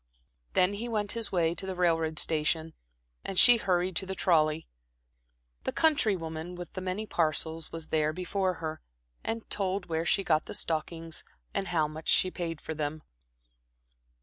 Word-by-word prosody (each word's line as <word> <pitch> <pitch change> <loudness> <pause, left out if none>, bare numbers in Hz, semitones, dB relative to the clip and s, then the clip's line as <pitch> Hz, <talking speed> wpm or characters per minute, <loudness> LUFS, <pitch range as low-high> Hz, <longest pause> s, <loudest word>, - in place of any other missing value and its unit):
Then 185 +2 +4
he 230 +4 -4
went 210 -3 -1
his 230 -2 -4
way 170 -3 +2
to 190 +2 -5
the 190 - -3
railroad 165 -3 +1
station, 160 +1 0 0.5
and 195 - -4
she 245 +4 +9
hurried 180 -3 +1
to 190 - -1
the 190 - -3
trolley. 155 -3 +2 1.0
The - - -1
country 290 -10 +4
woman 165 +1 -5
with 175 0 -8
the 185 - -4
many 185 +4 -2
parcels 160 -2 -1
was 165 -1 -6
there 155 -1 +2
before 185 +2 -1
her, 160 -1 -5 0.4
and 225 0 -3
told 195 -1 0
where 160 -1 -1
she 195 - +3
got 155 -4 +2
the - - -1
stockings, 165 0 -2 0.3
and 195 -1 -1
how 160 -4 +2
much 155 +1 -6
she 185 - +5
paid 165 -3 -4
for 160 - -5
them. 150 0 -3
175 Hz, 170 wpm, -30 LUFS, 160-190 Hz, 1.0 s, she